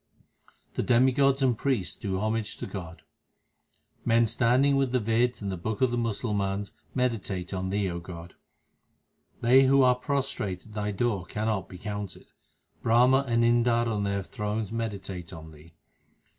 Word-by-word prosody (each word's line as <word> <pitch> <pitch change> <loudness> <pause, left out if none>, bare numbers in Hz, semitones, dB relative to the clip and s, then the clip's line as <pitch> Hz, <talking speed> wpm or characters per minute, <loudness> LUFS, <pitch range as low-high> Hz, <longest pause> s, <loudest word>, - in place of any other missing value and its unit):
The - - -1
demigods 130 +3 +3
and 125 -3 +3
priests 110 -8 -1
do 95 -2 -3
homage 110 +1 -2
to - - -5
God: 90 -4 -8 1.0
Men 115 0 +4
standing 125 +5 +3
with 135 -2 +1
the 125 - +3
Veds 115 +1 +1
and 100 - -2
the 95 - -4
books 110 +7 -2
of 130 - +3
the 120 - -1
Musal 115 -1 -2
mans 100 0 -2 0.2
meditate 105 -8 -2
on 95 0 -2
Thee, 100 0 0
O 85 - -4
God. 85 -1 -10 1.1
They 130 +3 +6
who 135 0 +5
are 125 -1 +6
prostrate 125 -8 -2
at 110 - -14
Thy 105 -1 -2
door 100 -3 -1
cannot 105 -1 -2
be 90 - -9
counted. 105 -1 -6 0.5
Brahma 125 +4 +4
and 115 -1 +2
Indar 120 0 +3
on 105 -3 -1
their 100 -1 -1
thrones 105 0 -3
meditate 100 -6 -5
on 80 -2 -10
Thee. 80 +2 -17
110 Hz, 160 wpm, -27 LUFS, 95-125 Hz, 1.1 s, They